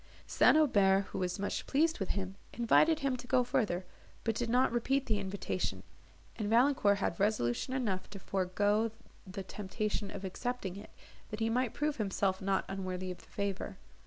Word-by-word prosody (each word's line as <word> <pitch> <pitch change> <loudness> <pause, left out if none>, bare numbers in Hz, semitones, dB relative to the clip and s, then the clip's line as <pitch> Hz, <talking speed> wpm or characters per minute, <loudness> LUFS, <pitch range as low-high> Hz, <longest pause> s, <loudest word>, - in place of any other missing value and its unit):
St. - - +5
Aubert, 200 -10 +4
who - - -4
was 180 -1 -1
much 200 0 -3
pleased 320 +4 +2
with 195 - -2
him, 190 -1 -3 0.2
invited 300 +7 +4
him 275 -2 +1
to 245 - -10
go 255 -1 +4
further, 200 -7 0 0.4
but 225 - +1
did 235 +1 -2
not 250 +2 +3
repeat 265 +4 +1
the 215 -3 0
invitation, 195 0 -3 0.5
and 210 -2 -2
Valancourt 230 -3 +4
had 180 -4 -2
resolution 200 - +1
enough 200 -8 -1
to 205 - -8
forego 205 +4 +1 0.4
the 190 +1 -6
temptation 210 +1 -3
of 200 0 -6
accepting 200 -1 -3
it, 205 +2 -10 0.4
that 215 - -5
he 225 0 +1
might 250 -1 0
prove 300 0 0
himself 195 -3 0
not 195 0 +1
unworthy 185 -1 -4
of 180 - -8
the - - -17
favour. 200 -1 -4
205 Hz, 175 wpm, -33 LUFS, 190-245 Hz, 0.5 s, St